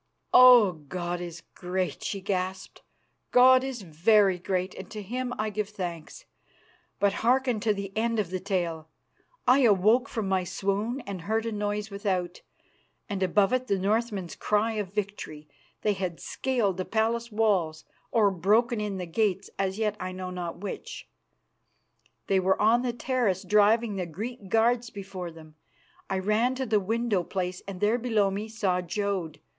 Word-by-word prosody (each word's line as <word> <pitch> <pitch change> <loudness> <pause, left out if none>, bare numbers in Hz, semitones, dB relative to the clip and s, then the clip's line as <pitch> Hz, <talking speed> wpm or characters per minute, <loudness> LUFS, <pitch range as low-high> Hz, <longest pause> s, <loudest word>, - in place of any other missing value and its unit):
"Oh! 250 -5 +8
God 175 +3 -5
is 170 -2 -7
great!" 185 0 -3
she 195 - -3
gasped. 190 -1 -3 0.5
"God 255 +1 +6
is 260 -5 -5
very 190 +3 +3
great, 185 +1 -2
and - - -9
to 215 -1 -7
Him 250 +5 -3
I 215 0 -1
give 210 -1 -3
thanks. 175 -6 -6 0.7
But 200 -1 +3
hearken 250 -1 +2
to 215 +1 +1
the 200 -1 -4
end 230 +1 0
of 200 -5 -1
the 185 - -2
tale. 170 -5 -2 0.6
I 255 +3 +6
awoke 220 0 +4
from 220 -4 -3
my 190 -1 +1
swoon 200 +7 -2
and 195 -5 -6
heard 220 +5 -1
noise 205 0 -2
without, 185 -3 -2 0.7
and 200 -1 -4
above 195 +3 +3
it 255 0 0
the 200 - +1
Northmen's 205 -2 -1
cry 210 +2 +1
of 210 -4 -3
victory. 200 -7 -5 0.4
They 210 - +2
had 185 -3 -4
scaled 235 -8 -1
the 185 - -2
palace 230 +1 0
walls 190 -8 +1 0.2
or 210 -4 +3
broken 210 +6 +2
in 205 -2 -3
the 180 - -4
gates 195 +2 -1
as 190 0 -1
yet 215 -2 0
I 185 0 -4
know 185 0 -5
not 175 -2 -5
which 205 - -7 1.2
they 195 - +2
were 190 +1 +2
on 225 +3 +4
the 250 -1 -1
terrace 235 -6 -1
driving 210 +2 +3
the 180 -2 -2
Greek 205 +5 -7
guards 235 +2 +2
before 195 -4 -7
them. 155 -1 -14 0.5
I 195 - 0
ran 215 +6 +1
to 265 0 -2
the 215 -3 +2
window 220 0 0
place 180 0 -3
and 195 -2 -6
there 215 +5 +2
below 220 -5 +1
me 205 +3 -4
saw 195 -5 0
Jodd. 180 -3 -3
200 Hz, 165 wpm, -27 LUFS, 185-225 Hz, 1.2 s, Oh